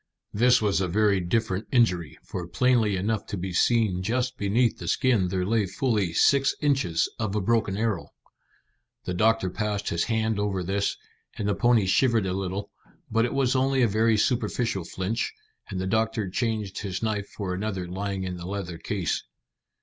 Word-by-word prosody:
This 120 +2 +4
was 100 -2 +2
a 95 - 0
very 100 +2 +2
different 95 +2 -1
injury, 90 - +2
for 90 -2 -6
plainly 115 0 +2
enough 100 +3 -1
to 100 - -4
be 90 0 -4
seen 105 -2 +2
just 125 +5 -1
beneath 115 +3 +1
the - - -6
skin 120 -9 +2
there 90 0 -1
lay 110 0 +1
fully 105 -2 0
six 135 +10 +3
inches 135 - +1
of 110 -2 -2
a - - +2
broken 105 -1 +1
arrow. 110 -5 -1 1.0
The 90 - -3
doctor 110 0 +2
passed 105 0 -2
his 85 0 0
hand 110 -2 0
over 100 -3 -1
this, 100 +3 -1 0.4
and 105 - -2
the 100 - +2
pony 120 -1 +3
shivered 115 +2 +3
a 90 - -1
little; 95 +1 -3 0.4
but 115 +1 +3
it 120 - -3
was 135 -1 +2
only 130 0 +2
a - - +5
very 110 +1 +2
superficial 115 -4 0
flinch, 95 +7 -3 0.3
and 95 -3 -4
the 95 - -2
doctor 110 -1 0
changed 110 -3 -2
his 100 0 -4
knife 105 -2 -1
for 95 -3 -5
another 95 -2 -3
lying 95 +1 -3
in 90 -1 -4
the 85 0 -7
leather 95 -4 -5
case. - - -2
105 Hz, 180 wpm, -26 LUFS, 95-115 Hz, 1.0 s, a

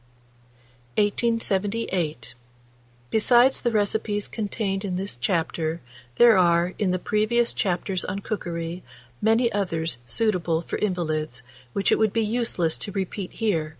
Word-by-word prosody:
1878. 200 - 0 0.8
Besides 240 +4 +4
the 240 - +1
recipes 210 -1 0
contained 205 -2 -2
in 190 -3 -2
this 190 -5 -3
chapter, 160 +3 -1 0.4
there 235 -5 +7
are, 175 0 +3
in 205 - +1
the 185 - +1
previous 215 +5 +1
chapters 185 -1 -1
on 185 - -3
cookery, 175 -4 -4 0.4
many 225 +2 +3
others 165 - -1
suitable 175 - 0
for - - -4
invalids, 155 -9 -2 0.3
which 200 - +1
it - - +3
would 220 -2 +2
be 225 -1 +1
useless 210 -8 0
to 205 - -4
repeat 195 0 -4
here. 175 -9 0
195 Hz, 125 wpm, -25 LUFS, 170-220 Hz, 0.8 s, there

